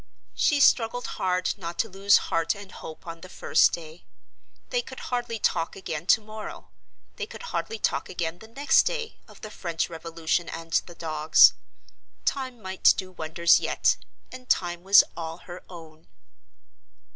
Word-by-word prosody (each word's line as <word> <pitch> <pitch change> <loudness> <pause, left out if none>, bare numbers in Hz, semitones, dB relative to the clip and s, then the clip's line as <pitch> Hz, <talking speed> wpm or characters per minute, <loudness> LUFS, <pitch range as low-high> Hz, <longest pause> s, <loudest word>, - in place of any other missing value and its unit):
She 295 -3 +2
struggled 245 -2 +3
hard 180 -1 -1
not 170 -2 -6
to 225 - +1
lose 200 0 +4
heart 165 +2 +1
and 200 -1 -11
hope 160 +3 -10
on 165 -1 -8
the 185 - -11
first - - +3
day. 160 0 -8 0.7
They - - +1
could 470 - -10
hardly 240 -2 -3
talk 165 -5 0
again 170 -3 -6
to 220 - +5
morrow, 215 0 -9 0.5
they - - -4
could 485 - -10
hardly 225 - -2
talk - - -1
again 170 -1 -4
the 220 - -13
next 285 +7 +3
day, 470 -3 -4
of - - -17
the 215 - -8
French 170 -4 -3
Revolution 165 +1 -2
and 165 0 -8 0.2
the 175 - -11
dogs. 155 -1 +5 0.7
Time 260 -3 -2
might 190 -2 +3
do 185 -1 -5
wonders 170 0 +3
yet; - - +1 0.3
and 255 0 -11
time 175 -1 +1
was 195 +2 +7
all 165 -1 -5
her 175 0 -9
own. 160 - -13
185 Hz, 160 wpm, -26 LUFS, 165-225 Hz, 0.7 s, was